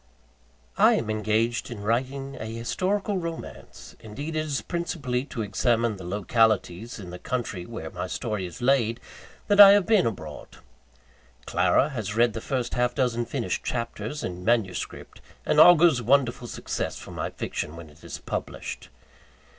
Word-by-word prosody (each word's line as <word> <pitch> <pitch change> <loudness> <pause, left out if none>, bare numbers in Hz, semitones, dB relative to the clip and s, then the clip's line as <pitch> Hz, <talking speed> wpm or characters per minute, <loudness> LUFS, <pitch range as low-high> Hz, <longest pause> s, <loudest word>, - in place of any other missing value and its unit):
I - - +7
am 110 -1 -1
engaged 110 +2 0
in 110 -4 -7
writing 135 +5 -1
a 110 - -5
historical 185 - -1
romance 165 -1 -8
indeed, 140 +9 -6
it - - +1
is 140 -2 -2
principally 140 -7 -2
to 115 -5 -4
examine 115 +2 +1
the 95 - -9
localities 105 +2 0
in 95 -5 -9
the 90 - -8
country 105 -8 -4
where - - -7
my - - -4
story 100 -4 -3
is 85 +7 -9
laid, 120 -3 +2 0.5
that 205 -1 +3
I 200 -1 +12
have 205 -2 +4
been 215 - +4
abroad. 80 -9 -7 0.9
Clara 145 - +2
has 110 -6 -4
read 120 0 +3
the 115 - -5
first 130 -2 -2
half 125 0 +1
dozen 120 -3 0
finished 120 -1 -3
chapters, 115 +3 -4
in 90 0 -5
manuscript, 110 -5 -1 0.2
and 150 - +2
augurs 165 -5 +7
wonderful 125 0 +2
success - - -4
for - - -10
my - - -3
fiction 75 - -5
when 85 -1 -10
it 75 - -21
is - - -6
published. - - -6
120 Hz, 155 wpm, -26 LUFS, 105-140 Hz, 0.9 s, I